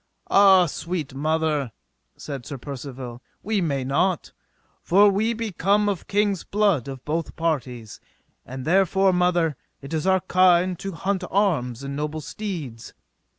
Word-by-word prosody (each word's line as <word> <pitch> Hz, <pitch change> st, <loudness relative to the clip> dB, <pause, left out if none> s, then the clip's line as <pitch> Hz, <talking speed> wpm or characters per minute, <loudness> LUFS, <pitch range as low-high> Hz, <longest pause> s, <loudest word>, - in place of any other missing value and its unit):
Ah, 195 Hz, -2 st, +7 dB
sweet 165 Hz, -3 st, -4 dB
mother, 155 Hz, -2 st, 0 dB, 0.5 s
said 140 Hz, -4 st, -7 dB
Sir 140 Hz, -, -6 dB
Percivale, 130 Hz, -2 st, -8 dB, 0.2 s
we 210 Hz, 0 st, 0 dB
may 140 Hz, -6 st, -1 dB
not, 165 Hz, +7 st, 0 dB, 0.5 s
for 200 Hz, +3 st, +5 dB
we 215 Hz, +4 st, +1 dB
be 225 Hz, -1 st, -4 dB
come 200 Hz, +4 st, +2 dB
of 200 Hz, -5 st, -2 dB
king's 205 Hz, -2 st, +1 dB
blood 200 Hz, -, +1 dB
of 135 Hz, -2 st, -8 dB
both 160 Hz, +2 st, -3 dB
parties, 125 Hz, -9 st, -3 dB, 0.4 s
and 130 Hz, +1 st, -8 dB
therefore, 190 Hz, +2 st, +3 dB
mother, 175 Hz, -3 st, +2 dB, 0.2 s
it 140 Hz, +3 st, -9 dB
is 160 Hz, +3 st, -1 dB
our 190 Hz, -1 st, +3 dB
kind 185 Hz, -1 st, +3 dB
to 195 Hz, -1 st, -5 dB
haunt 190 Hz, +3 st, -2 dB
arms 140 Hz, -, 0 dB
and 140 Hz, 0 st, -5 dB
noble 150 Hz, +1 st, -4 dB
deeds. 160 Hz, -, -6 dB
165 Hz, 145 wpm, -24 LUFS, 140-195 Hz, 0.5 s, Ah